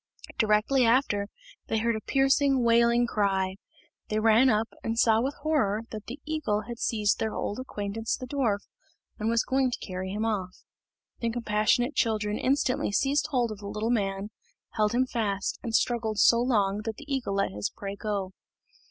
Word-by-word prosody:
Directly 220 Hz, +5 st, +3 dB
after, 230 Hz, -4 st, +2 dB, 0.4 s
they 225 Hz, -, 0 dB
heard 230 Hz, +1 st, +1 dB
a 215 Hz, -, -4 dB
piercing, 270 Hz, 0 st, +2 dB
wailing 235 Hz, +1 st, +4 dB
cry. 195 Hz, -4 st, 0 dB, 0.5 s
They 215 Hz, -, 0 dB
ran 225 Hz, +4 st, +5 dB
up, 220 Hz, -1 st, +2 dB, 0.2 s
and 225 Hz, 0 st, -2 dB
saw 225 Hz, -1 st, +4 dB
with 270 Hz, +3 st, -2 dB
horror 230 Hz, -9 st, +1 dB
that 215 Hz, -1 st, -7 dB
the 250 Hz, +5 st, -7 dB
eagle 300 Hz, -9 st, -1 dB
had 235 Hz, +2 st, -8 dB
seized 210 Hz, -3 st, +1 dB
their 220 Hz, -1 st, -2 dB
old 205 Hz, -, -3 dB
acquaintance 220 Hz, -3 st, -3 dB
the 255 Hz, -, -7 dB
dwarf, 245 Hz, -7 st, 0 dB, 0.6 s
and 220 Hz, +1 st, 0 dB
was 230 Hz, 0 st, +2 dB
going 265 Hz, 0 st, +1 dB
to 245 Hz, -, -3 dB
carry 185 Hz, 0 st, -5 dB
him 210 Hz, +3 st, -2 dB
off. 190 Hz, -5 st, -3 dB, 0.6 s
The 235 Hz, -, -1 dB
compassionate 230 Hz, +3 st, +1 dB
children 215 Hz, -4 st, 0 dB
instantly 260 Hz, -4 st, +1 dB
seized 275 Hz, +8 st, +1 dB
hold 250 Hz, -6 st, 0 dB
of 210 Hz, -, -7 dB
the 200 Hz, -, -8 dB
little 215 Hz, +3 st, -2 dB
man, 200 Hz, -2 st, -1 dB, 0.4 s
held 215 Hz, 0 st, +1 dB
him 255 Hz, +2 st, +3 dB
fast, 205 Hz, -6 st, -2 dB
and 230 Hz, -3 st, -2 dB
struggled 225 Hz, -3 st, 0 dB
so 235 Hz, +2 st, +5 dB
long 210 Hz, -5 st, +1 dB
that 225 Hz, -1 st, -3 dB
the 295 Hz, -, -11 dB
eagle 265 Hz, -8 st, -2 dB
let 195 Hz, -, 0 dB
his 105 Hz, +1 st, -3 dB
prey 200 Hz, 0 st, -7 dB
go. 200 Hz, -3 st, -3 dB
225 Hz, 180 wpm, -27 LUFS, 205-245 Hz, 0.6 s, ran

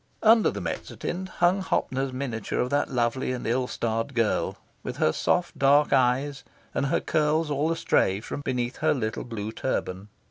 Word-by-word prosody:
Under 225 Hz, 0 st, +6 dB
the -, -, -5 dB
mezzotint 185 Hz, +2 st, -4 dB
hung 180 Hz, +2 st, +2 dB
Hoppner's 135 Hz, -7 st, -1 dB
miniature 130 Hz, -4 st, -3 dB
of 125 Hz, -, 0 dB
that 145 Hz, -, +1 dB
lovely 125 Hz, 0 st, 0 dB
and 125 Hz, -, -5 dB
ill 125 Hz, +2 st, +1 dB
starred 115 Hz, +3 st, -2 dB
girl, 115 Hz, -3 st, +1 dB, 0.2 s
with -, -, -6 dB
her 80 Hz, -, +3 dB
soft 180 Hz, -1 st, 0 dB
dark 145 Hz, +2 st, +4 dB
eyes, 135 Hz, +2 st, +2 dB, 0.3 s
and 140 Hz, -, 0 dB
her -, -, +2 dB
curls 155 Hz, 0 st, +1 dB
all 145 Hz, +3 st, +1 dB
astray 100 Hz, -11 st, +2 dB
from 120 Hz, -, -6 dB
beneath 125 Hz, -2 st, -2 dB
her 155 Hz, -1 st, +2 dB
little 110 Hz, -4 st, -2 dB
blue 110 Hz, -3 st, -5 dB
turban. 100 Hz, -5 st, -3 dB
130 Hz, 170 wpm, -26 LUFS, 120-150 Hz, 0.3 s, Under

